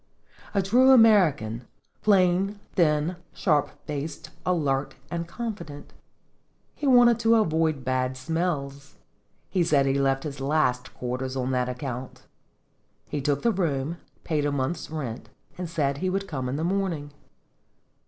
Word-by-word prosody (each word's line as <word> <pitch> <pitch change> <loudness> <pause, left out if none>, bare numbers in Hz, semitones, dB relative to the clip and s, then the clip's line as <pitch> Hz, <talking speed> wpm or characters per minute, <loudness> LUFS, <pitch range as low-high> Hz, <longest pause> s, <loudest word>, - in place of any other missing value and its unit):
A 195 - +3
true 245 +7 +5
American, 165 - +4 0.3
plain, 195 0 +3
thin, 160 0 +2 0.2
sharp 150 -5 +1 0.2
faced, 150 +1 -5 0.2
alert, 145 -6 0 0.2
and 170 -1 -3
confident. 200 -9 -7 0.8
He 290 - -3
wanted 240 -3 +6
to 230 0 +4
avoid 160 - +1
bad 130 0 0
smells; 140 -2 -3 0.5
he 185 -3 +1
said 145 -4 +3
he 135 - +2
left 135 -1 +1
his 145 -2 -6
last 135 -3 0
quarters 130 +1 -3
on 130 0 -1
that 125 -1 0
account. 125 0 -6 0.9
He 145 - -2
took 145 0 0
the 235 - +4
room, 165 -5 -1 0.3
paid 155 -3 0
a 145 - +1
month's 140 +4 -2
rent, 135 -7 -5 0.3
and 180 -2 -5
said 140 -4 -1
he 185 - 0
would 195 +1 -2
come 130 -4 -3
in 130 - -2
the 155 - -2
morning. 175 -5 -1
150 Hz, 140 wpm, -26 LUFS, 135-185 Hz, 0.9 s, wanted